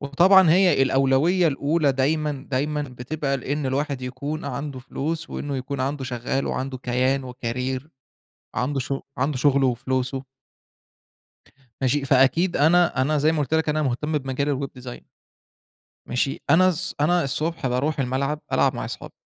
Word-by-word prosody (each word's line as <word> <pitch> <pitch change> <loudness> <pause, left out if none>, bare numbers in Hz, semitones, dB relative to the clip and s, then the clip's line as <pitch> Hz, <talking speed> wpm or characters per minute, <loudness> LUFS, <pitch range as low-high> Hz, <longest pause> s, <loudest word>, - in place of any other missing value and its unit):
وطبعًا 175 +5 +5
هي 180 -5 +4
الأولوية 135 +7 +3
الأولى 145 +1 +1
دايمًا، 145 +1 -1
دايمًا 150 +3 -1
بتبقى 140 +2 -3
لإن 140 +2 -3
الواحد 140 0 -2
يكون 140 +5 -5
عنده 140 -2 -5
فلوس، 160 +6 -4
وإنّه 140 -2 -4
يكون 130 +1 -4
عنده 135 +1 -2
شغّال 125 +2 -2
وعنده 130 0 -3
كيان 130 +2 0
وكارير، 125 +3 -4 0.7
عنده 135 +3 -1
شُغ 135 +2 -3 0.2
عنده 135 +1 0
شغله 140 -1 +3
وفلوسه. 130 +2 -2 1.6
ماشي، 135 +2 +1
فأكيد 140 +7 +3
أنا 165 -2 +3
أنا 150 +2 +1
زي 155 +3 +3
ما 160 - -1
قُلت 150 +2 -1
لك 160 -1 +1
أنا 155 +1 +1
مهتم 150 +4 -1
بمجال 135 +1 -2
الweb 135 -2 -6
design. 125 -1 -8 1.1
ماشي، 125 +3 -1
أنا 185 +3 +6
الص 185 +1 -1
أنا 175 +2 +3
الصبح 155 +2 -1
باروح 140 +5 0
الملعب 135 +4 -1
ألعب - - +3
مع - - -4
اصحابى، - - -7
140 Hz, 145 wpm, -23 LUFS, 130-155 Hz, 1.6 s, أنا